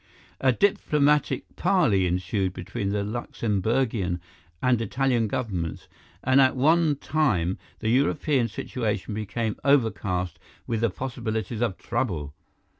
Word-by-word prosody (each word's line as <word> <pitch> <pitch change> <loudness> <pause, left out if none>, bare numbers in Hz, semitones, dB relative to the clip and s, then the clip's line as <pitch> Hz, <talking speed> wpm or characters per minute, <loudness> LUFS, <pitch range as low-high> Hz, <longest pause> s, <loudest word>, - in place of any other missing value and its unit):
"A 130 - +4
diplomatic 150 - +2
parley 150 - +3
ensued 95 +2 -1
between 100 +3 -4
the 100 0 0
Luxemburgian 105 -3 -1 0.4
and 125 -3 +2
Italian 120 0 +1
Governments, 95 -8 -3 0.4
and 130 +1 +5
at 130 0 +4
one 155 +3 +4
time 120 - 0 0.2
the 110 - 0
European 135 0 +2
situation 110 -1 -3
became 110 +1 -2
overcast 105 -10 +1 0.3
with 115 -2 -2
the 115 - +3
possibilities 110 -1 -4
of 115 -6 0
trouble. 90 - -2
115 Hz, 115 wpm, -26 LUFS, 100-130 Hz, 0.4 s, and